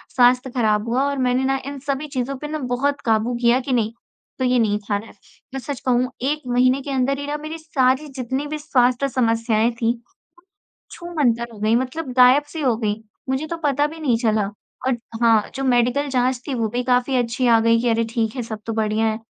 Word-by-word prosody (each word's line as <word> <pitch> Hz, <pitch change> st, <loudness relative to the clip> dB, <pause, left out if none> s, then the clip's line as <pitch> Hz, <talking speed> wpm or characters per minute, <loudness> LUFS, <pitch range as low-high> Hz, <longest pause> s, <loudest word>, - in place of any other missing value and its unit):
स्वास्थ्य 250 Hz, +1 st, +4 dB
ख़राब 215 Hz, -3 st, +1 dB
हुआ 255 Hz, +3 st, +2 dB
और 280 Hz, -, -3 dB
मैंने 255 Hz, 0 st, +1 dB
ना 270 Hz, 0 st, +1 dB
इन 280 Hz, 0 st, -5 dB
सभी 280 Hz, +2 st, -3 dB
चीज़ों 255 Hz, +2 st, -1 dB
पे 300 Hz, -, -6 dB
ना 310 Hz, +1 st, -3 dB, 0.2 s
बहुत 280 Hz, +3 st, 0 dB
काबू 225 Hz, +1 st, +1 dB
किया 240 Hz, +1 st, +4 dB
कि 260 Hz, 0 st, -3 dB
नहीं, 225 Hz, -2 st, +1 dB, 0.5 s
तो 260 Hz, -, +1 dB
ये 250 Hz, 0 st, +3 dB
नहीं 210 Hz, -2 st, +1 dB
खाना 205 Hz, 0 st, -1 dB
है। -, -, -14 dB, 0.4 s
मैं 270 Hz, -, -3 dB
सच 280 Hz, 0 st, -5 dB
कहूँ 250 Hz, 0 st, +2 dB
1 295 Hz, +3 st, 0 dB
महीने 255 Hz, +2 st, +3 dB
के 280 Hz, -, -6 dB
अंदर 270 Hz, +1 st, 0 dB
ही 285 Hz, -, -5 dB
ना 295 Hz, +1 st, -2 dB
मेरी 310 Hz, +2 st, -6 dB
सारी 285 Hz, -2 st, +1 dB
जितनी 265 Hz, +1 st, -4 dB
भी 305 Hz, +1 st, -4 dB
स्वास्थ्य 255 Hz, -2 st, +2 dB
समस्याएँ 230 Hz, -2 st, +1 dB
थीं, 230 Hz, +1 st, +3 dB, 1.0 s
छू-मंतर 250 Hz, -9 st, -1 dB
हो 210 Hz, -, -12 dB
गईं, 220 Hz, +2 st, +3 dB
मतलब 260 Hz, +3 st, -3 dB
गायब-सी 290 Hz, +5 st, +4 dB
हो 255 Hz, -5 st, +2 dB
गईं, 215 Hz, -1 st, -2 dB, 0.3 s
मुझे 265 Hz, +4 st, -1 dB
तो 335 Hz, +1 st, -4 dB
पता 290 Hz, 0 st, +2 dB
भी 320 Hz, +2 st, -10 dB
नहीं 245 Hz, -6 st, +2 dB
चला। 215 Hz, -3 st, +1 dB, 0.4 s
और 260 Hz, -, +1 dB, 0.3 s
हाँ, 225 Hz, -2 st, +3 dB
जो 270 Hz, -, -3 dB
मेडिकल 250 Hz, +3 st, +2 dB
जाँच 255 Hz, -1 st, +1 dB
थी, 280 Hz, -, -2 dB
वो 230 Hz, -3 st, 0 dB
भी 245 Hz, +3 st, -2 dB
काफ़ी 250 Hz, +1 st, +1 dB
अच्छी 245 Hz, +1 st, 0 dB
आ 230 Hz, -1 st, +6 dB
गई 230 Hz, 0 st, +4 dB
कि 245 Hz, -, +1 dB
अरे! 230 Hz, 0 st, +2 dB
ठीक 225 Hz, 0 st, -1 dB
है, 250 Hz, -, -2 dB
सब 220 Hz, -2 st, -6 dB
तो 225 Hz, -, -1 dB
बढ़िया 220 Hz, 0 st, 0 dB
है। 220 Hz, -, -1 dB
250 Hz, 220 wpm, -21 LUFS, 230-275 Hz, 1.0 s, आ